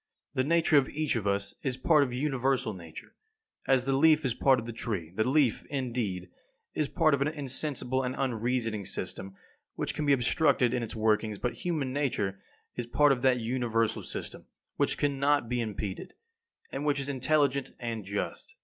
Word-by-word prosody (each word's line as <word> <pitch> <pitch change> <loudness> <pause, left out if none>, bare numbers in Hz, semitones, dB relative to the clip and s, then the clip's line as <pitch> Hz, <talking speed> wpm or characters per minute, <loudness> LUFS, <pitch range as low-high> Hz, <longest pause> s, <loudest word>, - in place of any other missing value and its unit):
The 130 - +1
nature 165 +1 +3
of 135 -2 +3
each 155 -2 -1
of 105 -3 -1
us 100 0 -1
is 130 -2 -2
part 150 +3 +4
of 135 -3 +1
universal 130 -3 0
Nature, 85 -4 -11 0.5
as 130 -2 +3
the 135 - +1
leaf 155 +2 +4
is 125 - +1
part 135 +2 +4
of 115 - -6
the 120 - -6
tree; 95 -8 -4
the 110 +5 +1
leaf, 135 -5 +2
indeed, 115 -10 -3 0.4
is 155 - 0
part 155 - +2
of 140 - +1
an 140 - +3
insensible 135 -3 -1
and 130 0 -2
unreasoning 120 -4 -1
system 95 +1 -5 0.4
which - - -2
can 150 - -2
be 140 - +6
obstructed 130 -1 +2
in 125 - 0
its 115 - -5
workings; 110 -1 +1
but 125 +4 -2
human 150 -7 -2
nature 105 -9 -1 0.3
is 120 -1 -4
part 145 +4 +4
of 130 -2 +1
that 130 -1 +3
universal 115 -2 0
system - - -5 0.3
which - - +1
cannot 140 -2 +1
be 120 +1 -1
impeded, 110 - -5 0.6
and - - -4
which 145 -1 +1
is 135 - -3
intelligent 140 0 +1
and 115 -3 -4
just. 100 +1 -4
130 Hz, 180 wpm, -29 LUFS, 115-140 Hz, 0.6 s, be